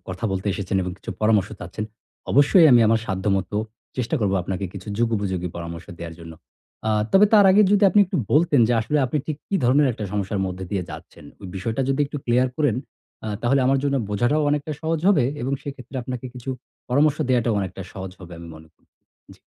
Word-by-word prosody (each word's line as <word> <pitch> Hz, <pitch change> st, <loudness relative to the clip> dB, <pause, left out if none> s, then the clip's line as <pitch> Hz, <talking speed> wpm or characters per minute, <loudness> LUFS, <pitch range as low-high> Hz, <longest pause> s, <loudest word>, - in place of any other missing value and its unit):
কথা 95 Hz, +4 st, -5 dB
বলতে 95 Hz, +2 st, -3 dB
এসেছেন 100 Hz, -1 st, -2 dB
এবং 90 Hz, 0 st, -4 dB
কিছু -, -, -8 dB
পরামর্শ 105 Hz, -2 st, +3 dB
চাচ্ছেন। 90 Hz, +5 st, -5 dB, 0.5 s
অবশ্যই 145 Hz, +5 st, +6 dB
আমি 120 Hz, -, +7 dB
আমার 110 Hz, +1 st, +3 dB
সাধ্যমত 95 Hz, 0 st, -1 dB, 0.5 s
চেষ্টা 125 Hz, +4 st, -1 dB
করব 100 Hz, -2 st, +1 dB
আপনাকে 95 Hz, +1 st, -3 dB
কিছু 100 Hz, +1 st, -9 dB
যুগোপযোগী 100 Hz, -6 st, -1 dB
পরামর্শ 85 Hz, 0 st, -7 dB
দেওয়ার 85 Hz, -1 st, -7 dB
জন্য। 80 Hz, -1 st, -10 dB, 0.6 s
আ -, -, +2 dB, 0.2 s
তবে 200 Hz, +2 st, +7 dB
তার 205 Hz, -2 st, +7 dB
আগে, 205 Hz, +3 st, +6 dB
যদি 205 Hz, 0 st, +3 dB
আপনি 205 Hz, -, +5 dB
একটু -, -, -3 dB, 0.2 s
বলতেন, 150 Hz, -3 st, +4 dB
যে -, -, +2 dB
আসলে 150 Hz, +7 st, 0 dB
আপনি 150 Hz, +4 st, -1 dB
ঠিক 155 Hz, -, -3 dB
কী 200 Hz, -, -2 dB
ধরণের 140 Hz, +4 st, +4 dB
একটা 105 Hz, -1 st, -6 dB
সমস্যার 100 Hz, 0 st, -2 dB
মধ্যে 95 Hz, 0 st, -5 dB
দিয়ে 95 Hz, -3 st, -1 dB
যাচ্ছেন? -, -, -11 dB, 0.2 s
ওই 95 Hz, -, -8 dB
বিষয়টা 110 Hz, +7 st, -2 dB
যদি 135 Hz, +1 st, 0 dB
একটু 145 Hz, -, -7 dB
ক্লিয়ার 125 Hz, +2 st, +2 dB
করেন, 145 Hz, -7 st, +1 dB, 0.5 s
আ -, -, -3 dB
তাহলে 135 Hz, +3 st, +3 dB
আমার 135 Hz, +1 st, +3 dB
জন্য 140 Hz, -1 st, +1 dB
বোঝাটাও 120 Hz, +9 st, +1 dB
অনেকটা 150 Hz, +1 st, -1 dB
সহজ 160 Hz, 0 st, -1 dB
হবে 165 Hz, -12 st, +4 dB, 0.2 s
এবং 135 Hz, +2 st, -2 dB
সেক্ষেত্রে 135 Hz, -2 st, -8 dB
আপনাকে 125 Hz, 0 st, -5 dB
কিছু 125 Hz, +1 st, -6 dB, 0.4 s
পরামর্শ 145 Hz, +3 st, +3 dB
দেওয়াটাও 120 Hz, -3 st, +2 dB
অনেকটা 95 Hz, 0 st, -5 dB
সহজ 95 Hz, -1 st, -6 dB
হবে, 90 Hz, -1 st, -11 dB
আমি 85 Hz, 0 st, -10 dB
মনে 80 Hz, 0 st, -14 dB
কর -, -, -37 dB, 0.5 s
জি। -, -, -25 dB
115 Hz, 200 wpm, -23 LUFS, 95-140 Hz, 0.6 s, আমি